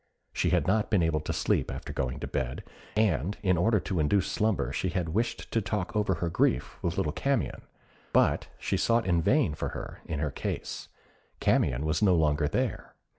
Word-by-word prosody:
She -, -, +1 dB
had -, -, +2 dB
not 105 Hz, +2 st, +1 dB
been 100 Hz, -6 st, +3 dB
able 80 Hz, -2 st, +1 dB
to 75 Hz, -, -4 dB
sleep -, -, 0 dB
after -, -, -6 dB
going 65 Hz, -2 st, -2 dB
to -, -, -3 dB
bed, 60 Hz, -, -3 dB, 0.3 s
and 100 Hz, -4 st, +1 dB
in 95 Hz, -2 st, +3 dB
order 105 Hz, +6 st, +3 dB
to 95 Hz, -, -2 dB
induce 90 Hz, +5 st, +2 dB
slumber 100 Hz, -, 0 dB
she 95 Hz, -, -1 dB
had 85 Hz, -1 st, -2 dB
wished 115 Hz, +6 st, -2 dB
to 115 Hz, -, +1 dB
talk 100 Hz, +1 st, -3 dB
over 105 Hz, -3 st, +2 dB
her 85 Hz, +1 st, -2 dB
grief 65 Hz, -6 st, 0 dB
with 85 Hz, 0 st, -2 dB
little 75 Hz, -, +1 dB
Camion; 135 Hz, -, -1 dB, 0.5 s
but -, -, +3 dB
she -, -, -1 dB
sought 115 Hz, 0 st, +2 dB
in 85 Hz, -2 st, +2 dB
vain 125 Hz, -, +3 dB
for -, -, -3 dB
her -, -, -7 dB
in 80 Hz, -, -3 dB
her 75 Hz, 0 st, -1 dB
case: -, -, -4 dB, 0.5 s
Camion 65 Hz, +5 st, +2 dB
was 80 Hz, 0 st, 0 dB
no 95 Hz, -4 st, +5 dB
longer 75 Hz, -2 st, +2 dB
there. 125 Hz, -, -2 dB
90 Hz, 195 wpm, -29 LUFS, 75-105 Hz, 0.5 s, no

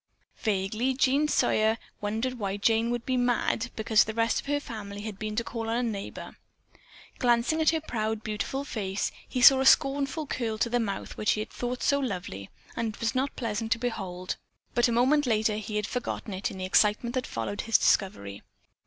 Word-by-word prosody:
Vaguely 215 Hz, +5 st, 0 dB
Jean 275 Hz, +3 st, +3 dB
Sawyer 220 Hz, -6 st, +2 dB, 0.2 s
wondered 225 Hz, +5 st, -2 dB
why 200 Hz, -1 st, -2 dB
Jane 225 Hz, +2 st, +2 dB
would 240 Hz, -1 st, -2 dB
be 255 Hz, -1 st, 0 dB
"mad" 245 Hz, 0 st, +1 dB
because 220 Hz, -1 st, +4 dB
the 220 Hz, -, -6 dB
rest 230 Hz, 0 st, +2 dB
of -, -, -9 dB
her 290 Hz, 0 st, +1 dB
family 205 Hz, -6 st, -7 dB
had 210 Hz, -2 st, -6 dB
been 215 Hz, -1 st, -3 dB
to 235 Hz, -, 0 dB
call 230 Hz, -1 st, -5 dB
upon 225 Hz, +1 st, -1 dB
a 245 Hz, -, 0 dB
neighbor. 210 Hz, -4 st, -5 dB, 0.8 s
Glancing 245 Hz, +5 st, +2 dB
at 315 Hz, -, +5 dB
her 320 Hz, -, +1 dB
proud, 220 Hz, -6 st, -2 dB
beautiful 215 Hz, +6 st, -3 dB
face, 205 Hz, -7 st, -2 dB, 0.2 s
he 250 Hz, -, -1 dB
saw 270 Hz, +1 st, +9 dB
a -, -, +1 dB
scornful 275 Hz, +3 st, +3 dB
curl 230 Hz, -5 st, -2 dB
to 230 Hz, +1 st, 0 dB
the 245 Hz, -, +2 dB
mouth 205 Hz, -4 st, -4 dB
which 215 Hz, -, +2 dB
he -, -, -3 dB
had 215 Hz, -, -5 dB
thought 245 Hz, 0 st, -4 dB
so 280 Hz, -, +3 dB
lovely, 180 Hz, -, -4 dB, 0.3 s
and 225 Hz, -2 st, -2 dB
it -, -, -17 dB
was 230 Hz, +1 st, 0 dB
not 265 Hz, +1 st, -1 dB
pleasant 225 Hz, -1 st, -3 dB
to -, -, -6 dB
behold. 195 Hz, -7 st, -4 dB, 0.4 s
But 240 Hz, +1 st, +3 dB
a -, -, 0 dB
moment 260 Hz, +5 st, +3 dB
later 215 Hz, -2 st, +2 dB
he 215 Hz, 0 st, -5 dB
had 210 Hz, -1 st, 0 dB
forgotten 240 Hz, -3 st, -4 dB
it, 190 Hz, +1 st, -2 dB
in 195 Hz, -, -8 dB
the 185 Hz, -, -3 dB
excitement 210 Hz, +5 st, +2 dB
that 255 Hz, -1 st, -2 dB
followed 115 Hz, -, -3 dB
his 225 Hz, -, +3 dB
discovery. 100 Hz, -, +1 dB
225 Hz, 205 wpm, -28 LUFS, 210-250 Hz, 0.8 s, saw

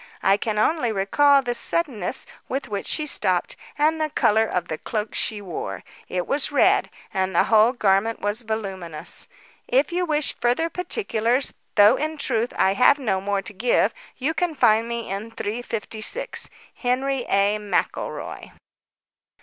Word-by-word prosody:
I 195 Hz, -, +5 dB
can 210 Hz, 0 st, -2 dB
only 245 Hz, +2 st, +2 dB
recall 275 Hz, +8 st, +3 dB
the 245 Hz, -1 st, -1 dB
suddenness 245 Hz, -, +1 dB, 0.2 s
with 270 Hz, +1 st, -3 dB
which 200 Hz, -1 st, -4 dB
she 305 Hz, -, +1 dB
stooped -, -, 0 dB, 0.2 s
and 315 Hz, +2 st, +2 dB
the 310 Hz, -, 0 dB
colour 220 Hz, -6 st, +3 dB
of 180 Hz, -, -2 dB
the 155 Hz, -, -4 dB
cloak 215 Hz, -1 st, -3 dB
she 210 Hz, -2 st, -2 dB
wore. 150 Hz, -, -6 dB, 0.2 s
It 180 Hz, -1 st, -2 dB
was 285 Hz, +1 st, 0 dB
red, 370 Hz, +8 st, +3 dB, 0.2 s
and 190 Hz, -1 st, -1 dB
the -, -, +5 dB
whole 220 Hz, +1 st, +5 dB
garment 215 Hz, -1 st, +1 dB
was 205 Hz, +3 st, -1 dB
voluminous. 195 Hz, -8 st, -4 dB, 0.4 s
If 270 Hz, +6 st, +2 dB
you 360 Hz, +1 st, 0 dB
wish 300 Hz, -2 st, +1 dB
further 250 Hz, +8 st, +1 dB
particulars, 260 Hz, -, 0 dB, 0.2 s
though 210 Hz, +4 st, +6 dB
in 310 Hz, +1 st, -3 dB
truth, 235 Hz, -4 st, -1 dB
I 190 Hz, -, +3 dB
have 250 Hz, +7 st, +5 dB
no 205 Hz, -9 st, -1 dB
more 200 Hz, 0 st, -1 dB
to 220 Hz, -, -6 dB
give, 235 Hz, +5 st, +2 dB, 0.2 s
you 285 Hz, +5 st, 0 dB
can 325 Hz, 0 st, -1 dB
find 225 Hz, -3 st, +3 dB
me 235 Hz, -1 st, -4 dB
in 200 Hz, +4 st, -4 dB
356. 225 Hz, -, -3 dB, 0.2 s
"HENRY 260 Hz, +1 st, -1 dB
A. 200 Hz, +2 st, +2 dB
MCELROY." 205 Hz, -1 st, -3 dB
230 Hz, 155 wpm, -23 LUFS, 205-280 Hz, 0.4 s, though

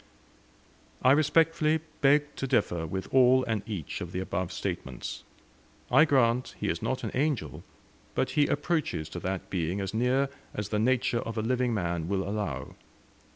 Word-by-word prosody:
I 130 Hz, -, +6 dB
respectfully 155 Hz, +2 st, +3 dB, 0.2 s
beg 145 Hz, +1 st, +3 dB
to 135 Hz, -, -2 dB
differ 90 Hz, -10 st, +1 dB
with 95 Hz, +4 st, -4 dB
all 130 Hz, 0 st, +6 dB
and 110 Hz, -3 st, -1 dB
each 95 Hz, -9 st, -4 dB
of 90 Hz, -1 st, -6 dB
the 90 Hz, -, -2 dB
above 95 Hz, -1 st, -2 dB
statements. 65 Hz, -2 st, -5 dB, 0.7 s
I 155 Hz, -, +7 dB
grant 125 Hz, -4 st, +2 dB
he -, -, -1 dB
is -, -, -2 dB
not -, -, -2 dB
an -, -, -3 dB
angel, 145 Hz, 0 st, -1 dB, 0.5 s
but -, -, 0 dB
he 145 Hz, -1 st, +3 dB
approaches 145 Hz, -, -1 dB
to 85 Hz, -, -6 dB
that 95 Hz, +1 st, -4 dB
being 90 Hz, +1 st, -1 dB
as 95 Hz, 0 st, -3 dB
near 125 Hz, +4 st, +2 dB, 0.3 s
as 105 Hz, -1 st, -3 dB
the 105 Hz, -, 0 dB
nature 120 Hz, 0 st, +2 dB
of 115 Hz, 0 st, -5 dB
a 110 Hz, -, 0 dB
living 125 Hz, +1 st, +1 dB
man 85 Hz, -4 st, -2 dB
will 95 Hz, 0 st, -1 dB
allow. 105 Hz, 0 st, -3 dB
115 Hz, 165 wpm, -28 LUFS, 95-135 Hz, 0.7 s, I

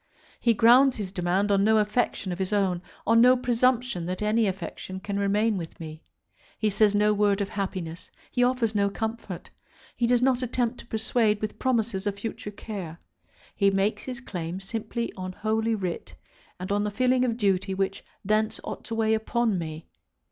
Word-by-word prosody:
He 235 Hz, -2 st, +3 dB
grounds 245 Hz, +5 st, +6 dB
his 200 Hz, -4 st, -4 dB
demand 190 Hz, +2 st, 0 dB
on 200 Hz, 0 st, +3 dB
no 220 Hz, +1 st, +4 dB
affection 210 Hz, -2 st, 0 dB
of 175 Hz, -, -5 dB
his 190 Hz, +1 st, -2 dB
own, 190 Hz, -4 st, +1 dB, 0.2 s
on 230 Hz, +1 st, +5 dB
no 250 Hz, +1 st, +7 dB
presumption 245 Hz, -6 st, +1 dB
that 185 Hz, +3 st, -3 dB
any 215 Hz, +1 st, +2 dB
affection 190 Hz, 0 st, -5 dB
can 200 Hz, +1 st, -3 dB
remain 205 Hz, +2 st, +2 dB
with 165 Hz, -2 st, -8 dB
me. 155 Hz, -1 st, -8 dB, 0.6 s
He 215 Hz, -1 st, +1 dB
says 205 Hz, 0 st, +3 dB
no 210 Hz, +1 st, +4 dB
word 205 Hz, -1 st, +2 dB
of 200 Hz, -1 st, -1 dB
happiness. 185 Hz, -4 st, -4 dB, 0.2 s
He 245 Hz, -, +2 dB
offers 245 Hz, -3 st, +1 dB
no 200 Hz, -1 st, +2 dB
comfort. 220 Hz, -3 st, -5 dB, 0.4 s
He 235 Hz, -, +1 dB
does 245 Hz, 0 st, +4 dB
not 260 Hz, -1 st, +3 dB
attempt 245 Hz, -1 st, -1 dB
to -, -, -12 dB
persuade 220 Hz, -1 st, +1 dB
with 215 Hz, 0 st, -4 dB
promises 225 Hz, -6 st, 0 dB
of 200 Hz, -1 st, -2 dB
future 215 Hz, 0 st, -5 dB
care. 195 Hz, -6 st, -7 dB, 0.6 s
He 200 Hz, -, +4 dB
makes 195 Hz, +2 st, 0 dB
his 255 Hz, -1 st, -5 dB
claim 180 Hz, -6 st, -5 dB
simply 225 Hz, +4 st, -4 dB
on 185 Hz, -1 st, -5 dB
Holy 220 Hz, +2 st, 0 dB
Writ, 185 Hz, -5 st, -4 dB, 0.4 s
and 185 Hz, +2 st, -5 dB
on 205 Hz, 0 st, +1 dB
the 210 Hz, -, 0 dB
feeling 255 Hz, +4 st, +2 dB
of 235 Hz, -2 st, 0 dB
duty 195 Hz, -3 st, +1 dB
which 195 Hz, 0 st, -2 dB, 0.2 s
thence 215 Hz, +2 st, +1 dB
ought -, -, -6 dB
to 230 Hz, -, -4 dB
weigh 220 Hz, -1 st, +2 dB
upon 220 Hz, -2 st, 0 dB
me. 160 Hz, -1 st, -6 dB
210 Hz, 185 wpm, -26 LUFS, 195-230 Hz, 0.6 s, no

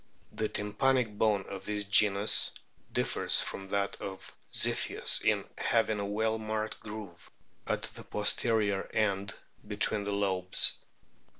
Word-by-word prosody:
The 110 Hz, -, -2 dB
tympanic 110 Hz, +2 st, 0 dB
bone 105 Hz, -3 st, +2 dB
of 95 Hz, -1 st, -8 dB
this 105 Hz, -1 st, -2 dB
genus 100 Hz, 0 st, +4 dB, 0.4 s
differs -, -, +2 dB
from 95 Hz, -, -4 dB
that 100 Hz, 0 st, -2 dB
of 95 Hz, -1 st, -8 dB, 0.2 s
Ziphius -, -, +2 dB
in -, -, +1 dB
having 110 Hz, -2 st, +1 dB
a 100 Hz, -, -2 dB
well 110 Hz, +2 st, -1 dB
marked 110 Hz, 0 st, -4 dB
groove 105 Hz, -5 st, -9 dB, 0.4 s
at -, -, -2 dB
the -, -, -6 dB
pos 105 Hz, -, 0 dB
terior 105 Hz, -4 st, 0 dB
end 100 Hz, -2 st, 0 dB, 0.3 s
between 105 Hz, 0 st, +4 dB
the 100 Hz, -, -3 dB
lobes. 95 Hz, -2 st, +1 dB
105 Hz, 130 wpm, -30 LUFS, 100-110 Hz, 0.4 s, genus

